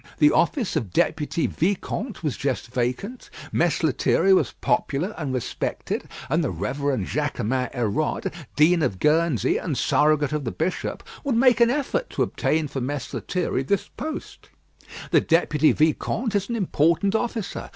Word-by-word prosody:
The 150 -1 +5
office 220 - +1
of 115 - -2
Deputy 150 - 0
Vicomte 200 - -2
was 150 -4 -1
just 130 -4 -3
vacant. 130 - -3 0.2
Mess - - +1
Lethierry 195 - +3
was 185 - +2
popular 200 -3 -1
and 150 -5 -3
respected, 125 -2 -3 0.2
and 160 +5 +1
the 145 - 0
Reverend 125 - -2
Jaquemin 130 -3 -1
Hérode, 120 +5 -1 0.2
Dean 165 +3 +4
of 100 -10 0
Guernsey 150 - +2
and - - -3
Surrogate 150 -1 +2
of 150 -1 -1
the 120 - -2
Bishop, 170 +4 -3 0.2
would 275 -5 0
make 240 -1 +4
an 235 - +6
effort 295 - -1
to - - 0
obtain 155 0 0
for 135 -1 -4
Mess 135 +1 -4
Lethierry 180 -7 -1
this 195 +9 -1
post. 305 +5 -7 0.6
The - - +5
Deputy 160 -2 +3
Vicomte 180 +9 0
is 200 +1 0
an 235 - -1
important 180 -1 +2
officer. 225 -2 -2
155 Hz, 150 wpm, -24 LUFS, 135-200 Hz, 0.6 s, an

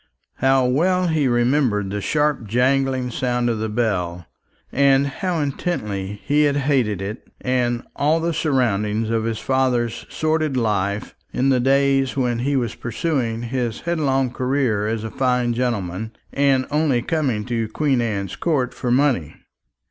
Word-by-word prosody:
How 135 0 +3
well 180 +8 +2
he 155 -4 +2
remembered 120 -5 +1
the 105 0 -3
sharp 150 -2 0
jangling 130 +2 +1
sound 120 0 0
of 110 - -2
the 110 0 -2
bell! 90 -7 -1 0.5
and 140 0 +4
how 170 +5 -2
intensely 105 - -3
he 150 +1 +3
had 145 -1 +2
hated 130 -9 +1
it 105 +4 -6
and 125 -2 0
all 155 +3 +2
the 170 +1 -1
surroundings 115 -8 0
of 115 -1 0
his 115 -1 -1
father's 125 -3 0
sordid 155 -3 0
life 105 -3 -1 0.2
in 130 +2 +1
the 130 -2 +3
days 135 +1 +2
when 120 -3 0
he 140 +4 0
was 120 -5 0
pursuing 120 -3 -2
his 120 -1 -2
headlong 135 -7 0
career 125 -5 0
as 110 0 -2
a 110 - -5
fine 125 -2 +1
gentleman, 110 -4 -2 0.2
and 135 -2 +2
only 145 -5 +2
coming 130 -9 -1
to 115 -2 -1
Queen 135 +2 +1
Anne's 100 -5 -2
Court 140 -7 0
for 125 - -3
money! 125 - +1
125 Hz, 150 wpm, -21 LUFS, 110-140 Hz, 0.5 s, and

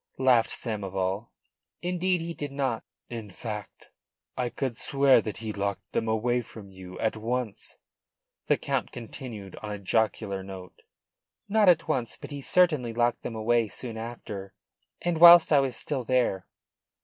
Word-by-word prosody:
laughed 130 -3 +4
Samoval. 100 -1 -2 0.5
"Indeed, 180 0 0
he 170 +1 -4
did 145 -3 -5
not." 135 -5 -1 0.2
"In 115 -3 -7
fact, 105 +1 -8 0.4
I 125 -1 -1
could 130 -1 -3
swear 135 0 +4
that 105 -1 -5
he 110 -1 -5
locked 100 0 -3
them 115 - -1
away 120 +3 +1
from 105 -4 -12
you 95 -1 -10
at 110 - 0
once?" 115 0 -3 0.7
the - - +3
Count - - -2
continued 115 -4 -8
on 105 - -7
a - - -4
jocular 100 -1 0
note. 95 -1 -10 0.7
"Not 210 -1 +4
at 165 -2 +4
once. 125 -7 -1
But - - -9
he 140 -1 -5
certainly 150 -8 +3
locked 120 +1 +1
them 115 - -5
away 115 +1 +2
soon 115 +2 -5
after, 110 -4 -7 0.5
and 175 -2 0
whilst 170 -1 +9
I 145 - +7
was 135 -3 0
still 140 -4 -3
there." 120 -7 +1
115 Hz, 155 wpm, -27 LUFS, 105-135 Hz, 0.7 s, whilst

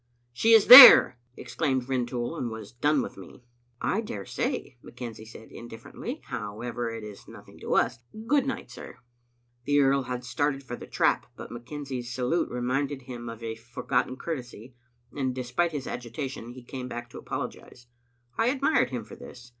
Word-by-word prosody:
"She 225 - +3
is 220 -2 +7
there!" 250 - +11 0.2
exclaimed 130 -5 -2
Rintoul, 125 +1 -3
and 125 -7 -3
was 110 -2 -9
done 145 +5 +1
with - - -9
me. - - -13 0.4
"I 215 - -1
daresay," 100 - -5
McKenzie 115 -3 -9
said 110 0 -13
indiflEerently. 115 -1 -9
"How 105 +1 -7
ever, 120 -1 -4
it 115 -1 -7
is 105 -2 -11
nothing - - -14
to - - -2
us. - - +1 0.3
Good 275 +2 +2
night, 270 - -5
sir." - - -11 0.7
The 145 0 +2
earl 135 0 +3
had 125 -1 -5
started 135 +3 -2
for 120 -2 -7
the - - -11
trap, - - 0
but - - -10
McKenzie's 125 0 -7
salute 130 +7 -1
reminded 130 +3 -2
him 120 -2 -8
of 115 0 -10
a 115 -1 -4
forgotten 125 +2 -3
courtesy, 125 -6 -7 0.4
and, 130 -3 -2
de 130 - -4
spite 165 +8 -1
his 145 -4 -5
agitation, 120 0 -6
he 125 0 -12
came 125 +1 -7
back 120 -1 -7
to - - -9
apologize. 120 - -7 0.5
I 225 - +3
ad 270 +1 -2
mired 280 - +2
him 125 -3 -5
for - - -12
this. 125 0 -13
125 Hz, 175 wpm, -26 LUFS, 120-140 Hz, 0.7 s, there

